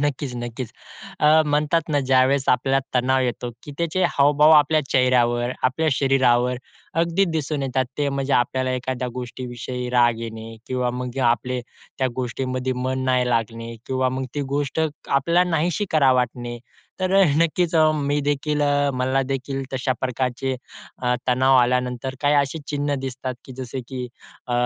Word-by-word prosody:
नक्कीच, 140 -3 -2
नक्कीच. 120 0 -5 0.5
अ, 155 +1 +6
म्हणतात 150 +2 +1
ना, 145 -2 +1
ज्यावेळेस 130 +1 +3
आपल्याला 135 +2 +3 0.2
तणाव 130 +1 +2
येतो, 120 0 -2
की 145 - -9
त्याचे 170 +2 0
हावभाव 145 +2 +4
आपल्या 155 +2 +3
चेहऱ्यावर, 120 -2 +2
आपल्या 145 +5 +1
शरीरावर 125 -2 +2 0.4
अगदी 170 +4 +2
दिसून 155 -4 -2
येतात, 130 0 0
ते 145 -1 +1
म्हणजे 140 0 -2
आपल्याला 130 +1 +1
एखाद्या 125 0 -3
गोष्टीविषयी 125 0 -5
राग 120 -2 +3
येणे 115 0 -7
किंवा 125 -1 -1
मग 125 +1 -5
आपले 120 +2 +1 0.4
त्या 130 - +2
गोष्टींमध्ये 130 +1 -2
मन 130 +1 -2
नाही 125 -1 +2
लागणे 115 0 -2
किंवा 130 0 0
मग 130 +1 -3
ती 145 - -1
गोष्ट 145 +2 -1 0.3
आपल्याला 170 +6 +2
नाहीशी 165 +4 0
करावी 150 -4 +4
वाटणे, 120 -1 -2 0.4
तर 185 0 0
अ, - - +7 0.2
नक्कीच 170 +1 0
अ, 155 -1 +5
मी 145 0 0
देखील, 145 +1 -1
अ, 145 0 +2
मला 130 +1 +1
देखील 135 0 -3
तशा 130 0 0
प्रकारचे 130 +1 -1 0.5
अ, 125 0 +2
तणाव 130 +1 +4
आल्यानंतर, 125 +1 0
काही 145 0 +3
अशी 145 +2 +1
चिन्ह 145 0 -1
दिसतात 130 -1 -4
की 130 - -10
जसे 130 0 -5
की 130 -2 -4 0.4
अ, 125 - -4
130 Hz, 155 wpm, -22 LUFS, 125-145 Hz, 0.5 s, अ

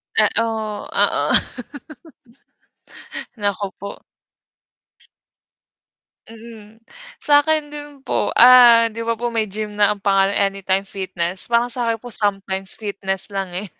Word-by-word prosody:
Eh, - - +5
o, - - +2 0.5
oo. - - +1 2.1
Naku 205 -1 -2
po. 200 +1 -9 2.3
Mm. 225 -1 -14 0.4
Sa 290 -1 +5
akin 305 -1 -1
din 295 0 -8
po, - - -2
ah, 235 -2 +7
'di 225 - -9
ba 230 - 0
po 240 +1 -4
may 225 -2 -1
gym 210 +1 -7
na 205 0 +3
ang 200 - -21
pangalan 195 0 +2
Anytime 195 -1 0
Fitness, 185 -2 -5
parang 235 +1 +1
sa'kin 235 -1 -1
po 245 - -9
sometimes 195 -2 -2
fitness 200 -2 -4
lang, 195 -3 -5
eh. 190 0 -5
210 Hz, 120 wpm, -19 LUFS, 195-235 Hz, 2.3 s, ah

